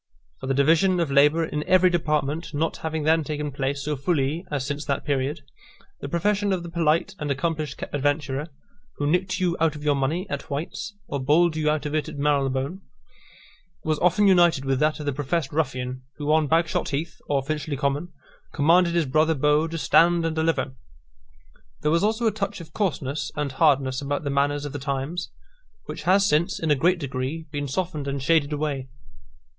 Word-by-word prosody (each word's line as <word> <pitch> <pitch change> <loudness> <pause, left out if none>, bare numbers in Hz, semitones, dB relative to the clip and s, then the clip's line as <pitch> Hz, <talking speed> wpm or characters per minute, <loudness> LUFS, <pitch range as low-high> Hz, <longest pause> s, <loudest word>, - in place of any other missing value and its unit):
For - - -6
the 135 - +1
division 165 +6 +3
of 165 -4 0
labour 150 +4 +4
in 150 -1 -3
every 185 0 +5
department 155 -1 -1
not 160 +2 -1
having 160 -1 -3
then 160 +1 +3
taken 150 0 -3
place 135 +1 -2
so 150 0 -1
fully 145 +2 0
as 140 -3 -2
since 145 +1 -3
that 140 - -2
period, 140 0 -1 0.6
the - - -6
profession 205 +4 +1
of 185 -2 -1
the 170 - -8
polite 170 +2 +1
and 150 -2 -3
accomplished 150 0 -2
adventurer, 145 0 -1 0.5
who 145 - -2
nicked 180 +5 +1
you 180 -2 +1
out 160 -1 +2
of 150 - -8
your 150 -1 +3
money 145 +7 -1
at 140 +2 -5
White's, 170 +8 -4
or 140 - -3
bowled 155 +5 +3
you 155 -1 +1
out 150 -1 0
of 150 - -3
it 155 -2 -1
at - - -8
Marylebone, 140 +3 0 1.0
was 155 -1 0
often 180 +4 +3
united 175 -7 +4
with 135 -1 +1
that 155 +1 +1
of 150 - -5
the 145 - 0
professed 145 +2 -2
ruffian, 130 -4 -2
who 150 0 -2
on 155 -1 +3
Bagshot 165 +1 +1
Heath, 150 +2 -4
or 140 -2 +1
Finchley 150 0 -3
Common, 140 +6 -1 0.4
commanded 170 +4 +4
his 170 -2 +2
brother 155 +4 +2
beau 150 +3 +2
to 165 +1 -5
stand 170 +1 +4
and 160 -1 -1
deliver. 160 -4 0 1.1
There 150 - +1
was 170 +3 +2
also 220 +3 +1
a 220 - +4
touch 200 -1 -3
of 155 -3 -12
coarseness 145 -8 -2
and 145 -2 -2
hardness 135 -2 +2
about 145 +1 -2
the 140 - -2
manners 145 +1 +1
of 145 - -6
the 145 - -4
times, 140 +5 -3 0.6
which - - -6
has 195 +1 +5
since, 170 -1 +1
in 160 -2 0
a - - +5
great 175 +6 +2
degree, 140 +2 -4
been 145 -2 -3
softened 155 0 -3
and 140 0 -2
shaded 150 +1 +2
away. 145 -3 -2
150 Hz, 195 wpm, -24 LUFS, 140-165 Hz, 1.1 s, every